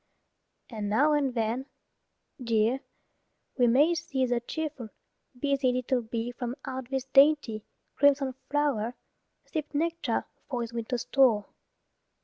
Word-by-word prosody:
And 210 Hz, -3 st, -3 dB
now 290 Hz, +9 st, +4 dB
and 275 Hz, -4 st, +1 dB
then, 235 Hz, +4 st, -1 dB, 0.8 s
dear, 230 Hz, +2 st, +2 dB, 0.8 s
we 245 Hz, -2 st, +4 dB
may 285 Hz, +8 st, +5 dB
see 285 Hz, -6 st, -1 dB
The 245 Hz, -1 st, +1 dB
cheerful, 280 Hz, -2 st, -5 dB, 0.5 s
busy 275 Hz, -2 st, +2 dB
little 250 Hz, 0 st, 0 dB
bee 230 Hz, +1 st, -3 dB
From 245 Hz, 0 st, -5 dB
out 260 Hz, -1 st, -5 dB
this 265 Hz, -1 st, -1 dB
dainty, 270 Hz, -5 st, +4 dB, 0.3 s
crimson 275 Hz, -2 st, +3 dB, 0.2 s
flow'r, 275 Hz, -6 st, 0 dB, 0.5 s
Sip 310 Hz, -2 st, -4 dB
nectar 335 Hz, +2 st, 0 dB, 0.2 s
for 245 Hz, -3 st, -2 dB
his 230 Hz, 0 st, -7 dB
winter 235 Hz, +2 st, -2 dB
store. 240 Hz, -4 st, +3 dB
260 Hz, 125 wpm, -28 LUFS, 235-285 Hz, 0.8 s, may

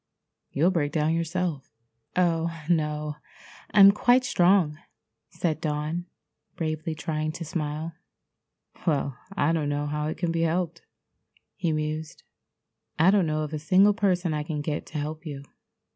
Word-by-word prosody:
You'll 165 Hz, +6 st, +3 dB
break 150 Hz, -5 st, 0 dB
down 155 Hz, +1 st, +1 dB
yourself." 165 Hz, -3 st, -2 dB, 0.4 s
"Oh, 170 Hz, -2 st, +2 dB, 0.2 s
no, 150 Hz, -2 st, 0 dB, 0.5 s
I'm 200 Hz, -1 st, +9 dB
quite 245 Hz, +5 st, +3 dB
strong," 175 Hz, -8 st, +3 dB, 0.5 s
said 160 Hz, -3 st, -2 dB
Dawn, 155 Hz, +3 st, -2 dB, 0.5 s
bravely 155 Hz, -1 st, -2 dB
trying 155 Hz, -1 st, -2 dB
to 170 Hz, 0 st, -6 dB
smile. 155 Hz, 0 st, -3 dB, 0.9 s
"Well, 140 Hz, -4 st, +1 dB, 0.2 s
I 145 Hz, +3 st, +3 dB
don't 155 Hz, -3 st, 0 dB
know 145 Hz, 0 st, -1 dB
how 150 Hz, +1 st, -2 dB
it 155 Hz, -, -3 dB
can 175 Hz, -2 st, -1 dB
be 165 Hz, 0 st, 0 dB
helped," 165 Hz, 0 st, 0 dB, 0.7 s
he 170 Hz, -3 st, -1 dB
mused. 155 Hz, 0 st, -3 dB, 0.7 s
"I 170 Hz, +4 st, +6 dB
don't 195 Hz, -4 st, +3 dB
know 155 Hz, 0 st, 0 dB
of 155 Hz, 0 st, -5 dB
a 155 Hz, -, -2 dB
single 185 Hz, +7 st, +5 dB
person 180 Hz, -4 st, +1 dB
I 150 Hz, -, -1 dB
can 150 Hz, 0 st, -3 dB
get 150 Hz, 0 st, -3 dB
to 155 Hz, -, -6 dB
help 155 Hz, +2 st, -4 dB
you. 145 Hz, -4 st, -6 dB
160 Hz, 145 wpm, -26 LUFS, 150-175 Hz, 0.9 s, I'm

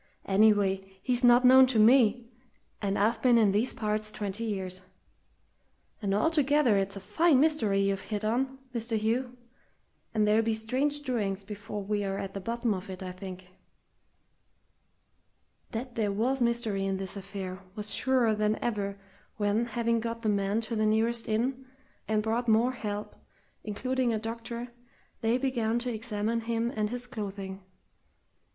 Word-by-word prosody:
"Anyway, 195 Hz, -2 st, +2 dB
he's 250 Hz, -1 st, 0 dB
not 245 Hz, +1 st, +6 dB
known 260 Hz, +1 st, +8 dB
to 250 Hz, -3 st, +1 dB
me, 235 Hz, +1 st, +4 dB, 0.5 s
and 200 Hz, -1 st, 0 dB
I've 215 Hz, +4 st, +1 dB
been 245 Hz, -2 st, +5 dB
in 215 Hz, -3 st, +4 dB
these 215 Hz, +6 st, +1 dB
parts 215 Hz, -1 st, -2 dB
twenty 205 Hz, +1 st, -4 dB
years. 190 Hz, -4 st, -3 dB, 1.2 s
And 200 Hz, -2 st, 0 dB
altogether 290 Hz, -2 st, +3 dB
it's 195 Hz, 0 st, 0 dB
a -, -, -5 dB
fine 315 Hz, -, +3 dB
mystery 245 Hz, -10 st, +2 dB
you've 195 Hz, 0 st, 0 dB
hit 210 Hz, -1 st, -3 dB
on, 260 Hz, +4 st, 0 dB, 0.2 s
Mr. 230 Hz, -1 st, -1 dB
Hugh, 240 Hz, +4 st, -1 dB, 0.7 s
and 215 Hz, -2 st, +1 dB
there'll 215 Hz, +2 st, +4 dB
be 225 Hz, 0 st, 0 dB
strange 265 Hz, +7 st, 0 dB
doings 210 Hz, -8 st, -2 dB
before 205 Hz, 0 st, -6 dB
we're 200 Hz, -1 st, -1 dB
at 195 Hz, 0 st, -5 dB
the 195 Hz, -, -4 dB
bottom 235 Hz, +2 st, -1 dB
of 190 Hz, 0 st, -6 dB
it, 185 Hz, 0 st, -7 dB
I'm 185 Hz, -1 st, -5 dB
thinking." 185 Hz, 0 st, -9 dB, 2.2 s
That 245 Hz, +2 st, -5 dB
there 215 Hz, -3 st, 0 dB
was 245 Hz, +6 st, 0 dB
mystery 235 Hz, -4 st, 0 dB
in 195 Hz, 0 st, -1 dB
this 190 Hz, 0 st, -4 dB
affair 195 Hz, -2 st, -6 dB, 0.2 s
was 210 Hz, 0 st, -5 dB
surer 255 Hz, -4 st, +2 dB
than 210 Hz, 0 st, +1 dB
ever 200 Hz, -4 st, -2 dB, 0.4 s
when, 210 Hz, +2 st, +1 dB
having 235 Hz, 0 st, 0 dB
got 230 Hz, +1 st, -4 dB
the 215 Hz, -, +1 dB
man 200 Hz, +1 st, +1 dB
to 230 Hz, +1 st, -3 dB
the 215 Hz, 0 st, +2 dB
nearest 225 Hz, +2 st, +1 dB
inn, 250 Hz, +5 st, 0 dB, 0.4 s
and 215 Hz, -1 st, +1 dB
brought 230 Hz, +2 st, -1 dB
more 230 Hz, +3 st, +4 dB
help, 210 Hz, -4 st, -5 dB, 0.5 s
including 240 Hz, +3 st, -1 dB
a -, -, 0 dB
doctor, 230 Hz, +2 st, -5 dB, 0.5 s
they 230 Hz, +2 st, +2 dB
began 240 Hz, -4 st, 0 dB
to 240 Hz, 0 st, -2 dB
examine 220 Hz, 0 st, -2 dB
him 230 Hz, +1 st, -1 dB
and 210 Hz, -1 st, 0 dB
his 245 Hz, +1 st, -4 dB
clothing. 200 Hz, -5 st, -6 dB
220 Hz, 155 wpm, -29 LUFS, 205-240 Hz, 2.2 s, known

